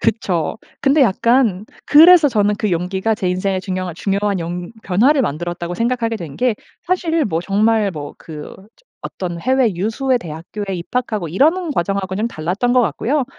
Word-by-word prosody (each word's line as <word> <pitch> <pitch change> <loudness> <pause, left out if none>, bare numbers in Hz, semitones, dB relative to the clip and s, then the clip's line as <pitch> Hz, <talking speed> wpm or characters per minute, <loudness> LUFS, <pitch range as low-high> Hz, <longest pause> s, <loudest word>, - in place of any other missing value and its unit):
그쵸. 180 -5 -1 0.2
근데 280 +3 +3
약간 230 -2 +2 0.2
그래서 330 +2 +8
저는 210 -3 +1
그 210 -4 -1
용기가 190 +5 -1
제 190 -3 -2
인생의 185 +1 -1
중요한 185 -2 -4
중요한 200 +1 -1
용 175 +3 -5
변화를 255 +10 +3
만들었다고 175 +1 -3
생각하게 230 0 -1
된 160 -8 -8
게 250 -3 +1 0.3
사실 330 -4 +1
뭐 165 -5 -1
정말 210 +2 +2
뭐 145 -2 -7
그 155 -2 -9 0.3
저 - - -30 0.2
어떤 175 -2 -5
해외 255 -3 +2
유수의 240 +7 0
대학교에 180 +4 -6
입학하고 215 +1 -3
이러는 315 - +2
과정하고는 195 +1 -2
좀 230 - 0
달랐던 190 +8 -1
거 250 - +5
같고요. 265 +4 0
205 Hz, 355 characters per minute, -18 LUFS, 180-250 Hz, 0.3 s, 그래서